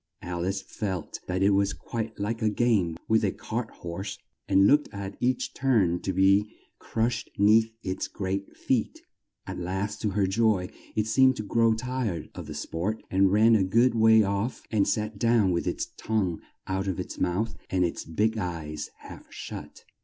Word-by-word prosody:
Al 85 Hz, -1 st, -3 dB
ice 95 Hz, 0 st, -2 dB
felt 95 Hz, -6 st, -4 dB
that 95 Hz, +1 st, 0 dB
it 100 Hz, -, +5 dB
was 100 Hz, -3 st, +2 dB
quite 110 Hz, +9 st, -5 dB
like 110 Hz, +3 st, -2 dB
a 110 Hz, -, +3 dB
game 105 Hz, -7 st, +1 dB
with 110 Hz, 0 st, +3 dB
a -, -, +2 dB
cart -, -, -4 dB
horse, 95 Hz, +4 st, -6 dB, 0.3 s
and 95 Hz, 0 st, +5 dB
looked 145 Hz, +7 st, +4 dB
at 100 Hz, -1 st, -6 dB
each 125 Hz, 0 st, 0 dB
turn 105 Hz, -10 st, +2 dB
to 95 Hz, -, -1 dB
be 100 Hz, +3 st, +4 dB, 0.3 s
crushed 115 Hz, +1 st, -1 dB
'neath 110 Hz, +2 st, +5 dB
its 95 Hz, 0 st, -2 dB
great 100 Hz, 0 st, -4 dB
feet. 125 Hz, -5 st, -1 dB, 0.4 s
At -, -, -6 dB
last, 95 Hz, +4 st, -3 dB
to 105 Hz, -, +1 dB
her 100 Hz, -, +4 dB
joy, 100 Hz, -2 st, +2 dB, 0.3 s
it 105 Hz, -, +1 dB
seemed 130 Hz, +4 st, +4 dB
to 105 Hz, -, -4 dB
grow 115 Hz, +1 st, +3 dB
tired 110 Hz, -9 st, -3 dB
of -, -, -8 dB
the -, -, -6 dB
sport 95 Hz, +7 st, -3 dB
and 95 Hz, 0 st, +4 dB
ran 110 Hz, +3 st, +5 dB
a 100 Hz, -, +3 dB
good 115 Hz, +7 st, +3 dB
way 110 Hz, -1 st, +6 dB
off 100 Hz, +5 st, -2 dB
and 105 Hz, -3 st, +2 dB
sat 105 Hz, -1 st, -1 dB
down 115 Hz, -4 st, +3 dB
with 85 Hz, -, -1 dB
its -, -, -1 dB
tongue 100 Hz, -7 st, -1 dB, 0.2 s
out 95 Hz, +1 st, -2 dB
of 95 Hz, -, -2 dB
its -, -, -6 dB
mouth 95 Hz, +5 st, 0 dB
and 90 Hz, -1 st, +2 dB
its 85 Hz, -, -3 dB
big 110 Hz, +7 st, 0 dB
eyes 80 Hz, -5 st, -4 dB
half -, -, -12 dB
shut. -, -, -8 dB
100 Hz, 185 wpm, -27 LUFS, 95-110 Hz, 0.4 s, way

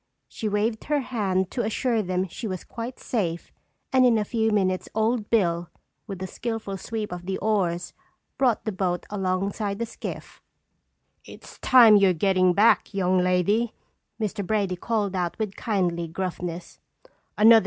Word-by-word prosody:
She 220 Hz, -, -4 dB
waved 215 Hz, +2 st, -1 dB
her 295 Hz, -1 st, +1 dB
hand 195 Hz, -7 st, -1 dB
to 245 Hz, -, -1 dB
assure 225 Hz, +1 st, 0 dB
them 185 Hz, -1 st, -1 dB
she 220 Hz, +6 st, -6 dB
was 185 Hz, -3 st, -4 dB
quite 235 Hz, +2 st, -7 dB
safe 175 Hz, -8 st, -2 dB, 0.4 s
and 260 Hz, -1 st, +5 dB
in 240 Hz, -3 st, +5 dB
a 210 Hz, -, 0 dB
few 225 Hz, 0 st, 0 dB
minutes, 190 Hz, -3 st, 0 dB
Old 220 Hz, 0 st, 0 dB
Bill, 175 Hz, -6 st, +1 dB, 0.4 s
with 190 Hz, -2 st, -6 dB
a -, -, -2 dB
skillful 220 Hz, -1 st, -4 dB
sweep 215 Hz, +1 st, -4 dB
of 175 Hz, 0 st, -7 dB
the 190 Hz, -, -1 dB
oars, 180 Hz, -5 st, -1 dB, 0.4 s
brought 250 Hz, -5 st, +1 dB
the 220 Hz, -, -1 dB
boat 185 Hz, -2 st, -2 dB
alongside 200 Hz, +1 st, -1 dB
the 235 Hz, -, -2 dB
skiff. 230 Hz, -, -8 dB, 0.8 s
"It's -, -, -13 dB
time 230 Hz, -5 st, +7 dB
you're 195 Hz, -2 st, +4 dB
getting 185 Hz, +1 st, +3 dB
back, 210 Hz, +1 st, +3 dB
young 185 Hz, -1 st, +2 dB
lady!" 185 Hz, +6 st, +1 dB, 0.4 s
Mr. 210 Hz, -1 st, -2 dB
Brady 200 Hz, -2 st, 0 dB
called 205 Hz, 0 st, -1 dB
out 175 Hz, -2 st, -2 dB
with 215 Hz, -3 st, -3 dB
kindly 180 Hz, -7 st, -1 dB
gruffness. 175 Hz, 0 st, -5 dB
200 Hz, 155 wpm, -25 LUFS, 185-220 Hz, 0.8 s, time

